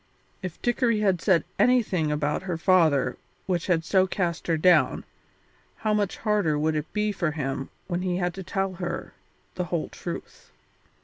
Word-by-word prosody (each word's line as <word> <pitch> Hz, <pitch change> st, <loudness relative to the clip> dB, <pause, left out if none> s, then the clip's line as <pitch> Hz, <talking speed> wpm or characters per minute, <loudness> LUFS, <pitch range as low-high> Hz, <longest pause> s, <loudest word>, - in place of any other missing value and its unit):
If 185 Hz, -3 st, -6 dB
Dickory 240 Hz, -2 st, +2 dB
had 190 Hz, -4 st, +2 dB
said 185 Hz, -5 st, +3 dB, 0.2 s
anything 205 Hz, -11 st, +3 dB
about 150 Hz, 0 st, 0 dB
her 180 Hz, -3 st, -3 dB
father 165 Hz, -6 st, +3 dB, 0.3 s
which 175 Hz, -3 st, -1 dB
had 165 Hz, -3 st, +1 dB
so 190 Hz, 0 st, +3 dB
cast 175 Hz, -3 st, -2 dB
her 165 Hz, -1 st, +2 dB
down, 180 Hz, +3 st, +4 dB, 0.7 s
how 215 Hz, -1 st, -1 dB
much 205 Hz, -2 st, 0 dB
harder 205 Hz, -9 st, +1 dB
would 155 Hz, +1 st, +1 dB
it 150 Hz, 0 st, -3 dB
be 210 Hz, 0 st, 0 dB
for 170 Hz, -5 st, -1 dB
him 135 Hz, -3 st, -3 dB, 0.2 s
when 175 Hz, -1 st, -2 dB
he 180 Hz, -1 st, -1 dB
had 175 Hz, -1 st, -1 dB
to 190 Hz, -, -7 dB
tell 195 Hz, 0 st, -2 dB
her 175 Hz, -, -4 dB, 0.4 s
the 180 Hz, -, -2 dB
whole 170 Hz, -1 st, -2 dB
truth. -, -, -8 dB
180 Hz, 170 wpm, -26 LUFS, 160-195 Hz, 0.7 s, down